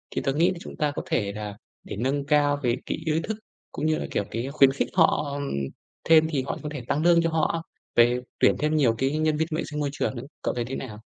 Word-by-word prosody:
Thì - - 0
tớ 135 - 0
nghĩ 170 +5 +3
là 180 - -5
chúng - - -9
ta 150 -1 +1
có - - -2
thể 100 -3 0
là 105 -1 -5 0.3
để - - -6
nâng 135 +5 -1
cao 145 0 +3
cái 120 0 +2
cái - - -2
ý 160 0 +2
thức 220 -1 -3 0.3
cũng 150 - -3
như 155 0 +2
là, - - -3
kiểu, - - 0
cái 115 +3 -2
khuyến 135 -2 +6
khích 135 - -1
họ 150 -4 +2 0.7
thêm 160 -1 +7
thì 135 -5 0
họ - - -2
có 150 - -3
thể 145 -4 -5
tăng 150 +3 0
lương 170 -1 +6
cho 165 - +1
họ 165 +1 0 0.3
về 120 +1 +5 0.2
tuyển - - +5
thêm 155 +1 +1
nhiều 125 -7 +3
cái 135 +3 +1
nhân 155 -1 +1
viên 160 - +1
vệ - - -1
sinh 150 - -3
môi 145 -1 0
trường 135 - -1
nữa. 120 - -6 0.2
Cậu - - -1
thấy 120 -1 -2
thế 135 - -4
nào? 110 -4 -7
145 Hz, 265 wpm, -26 LUFS, 125-155 Hz, 0.7 s, thêm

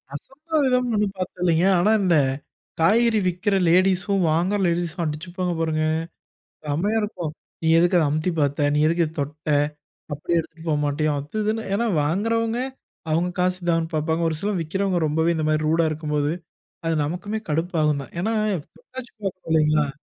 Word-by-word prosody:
அசம்பாவிதம்னு 270 - 0
ஒன்னும் 205 -2 0
பார்த்தது 185 -1 -5
இல்லைங்க. 170 +1 +3
ஆனா 210 +5 +3
இந்த 175 -3 +3 0.7
காய்கறி 225 +4 +4
விற்கற 185 +3 0
லேடீஸ்ஸும் 185 +2 +3
வாங்கற 185 +6 +1
லேடீஸும் 170 0 -1
அடிச்சுப்பாங்க 175 +4 -3
பாருங்க 155 -1 0 0.8
செம்மையா 175 +10 0
இருக்கும். 175 -7 -4 0.3
"நீ 160 - -1
எதுக்கு 175 +1 +4
அத - - +3
அமுத்தி 155 +4 0
பார்த்த? 145 0 +1
நீ - - +2
எதுக்கு 170 +1 +2
இத 155 - -7
தொட்ட? 150 +2 -4 0.6
அப்டி 145 +4 -4
எடுத்துட்டு 165 0 -6
போக 150 - +2
மாட்டியோ 150 +1 0
அது, 150 +9 -9
இதுன்னு." 220 +1 -1
ஏனா 235 +3 +1 0.2
வாங்குறவங்க 225 +8 0 0.5
அவங்க 165 +3 +1
காசு 185 0 +1
தான்ன்னு 165 0 0
பாப்பாங்க. 160 +2 0
ஒரு 160 - -2
சிலர் 200 -3 -1
விக்கிறவங்க 190 +3 -1
ரொம்பவே 160 +3 +1
இந்த 155 - -1
மாதிரி 155 0 +1
ரூடா 165 +1 +3
இருக்கும்போது, 150 -1 -1 0.5
அது 165 - +1
நமக்குமே 190 +8 -3
கடுப்பாகும்தான் 155 -3 0
ஏனா 220 +4 0 0.4
தொட்டாச்சி 260 - -10
பாக்கணும் 185 -3 -5
இல்லைங்களா? 150 -2 +3
170 Hz, 155 wpm, -23 LUFS, 155-200 Hz, 0.8 s, காய்கறி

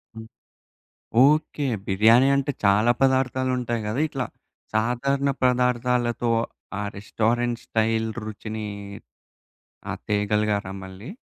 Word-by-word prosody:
హ్మ్. 110 0 -9 1.0
ఓకే. 150 0 +1 0.2
బిర్యానీ 110 +7 +5
అంటే, 140 +1 0
చాలా 105 +4 +4
పదార్థాలుంటాయి 130 -3 +1
గదా! 115 +7 -1
ఇట్లా. 135 -3 -3 0.5
సాధారణ 125 +5 +1
పదార్ధాలతో 125 -1 +1 0.5
ఆ - - -2 0.2
రెస్టారెంట్ 115 +3 -1
స్టైల్ 110 0 +1 0.2
రుచిని 110 0 -6 1.2
ఆ! - - -1 0.2
తేగలిగారా 105 -1 0
మళ్ళీ? 95 - -10
120 Hz, 90 wpm, -24 LUFS, 110-130 Hz, 1.2 s, బిర్యానీ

